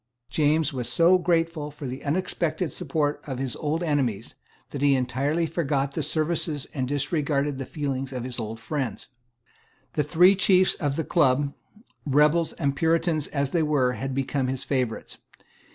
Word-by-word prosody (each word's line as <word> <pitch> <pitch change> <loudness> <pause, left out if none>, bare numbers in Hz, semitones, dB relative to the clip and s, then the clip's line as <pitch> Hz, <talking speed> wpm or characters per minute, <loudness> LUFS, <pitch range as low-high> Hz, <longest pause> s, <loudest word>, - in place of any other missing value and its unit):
James 155 -1 +2
was 125 -2 -2
so 170 +9 +5
grateful 165 -3 0
for 150 0 -9
the 130 +1 -6
unexpected 170 +1 -1
support 150 -3 -1
of 135 -3 -4
his 130 -1 -3
old 155 +3 -1
enemies, 130 - -1 0.4
that 140 - -5
he 140 -1 +4
entirely 135 +6 0
forgot 140 -4 -1
the - - -3
services 155 -2 0
and 130 -3 -2
disregarded 145 0 -1
the 135 - -5
feelings 135 -3 -3
of 125 -2 -4
his 125 0 -5
old 110 0 -5
friends. 125 -3 -4 0.8
The 150 - +1
three 175 +6 +5
chiefs 185 -1 +4
of 145 -3 -2
the 160 - -1
Club, 140 -3 +2 0.5
rebels 150 +3 +3
and 140 -3 -1
Puritans 165 0 +1
as 140 -2 -2
they 170 - +2
were, 145 -5 +2
had 135 +1 -4
become 135 0 -1
his 130 0 -3
favourites. 125 -5 -2
145 Hz, 160 wpm, -25 LUFS, 135-160 Hz, 0.8 s, so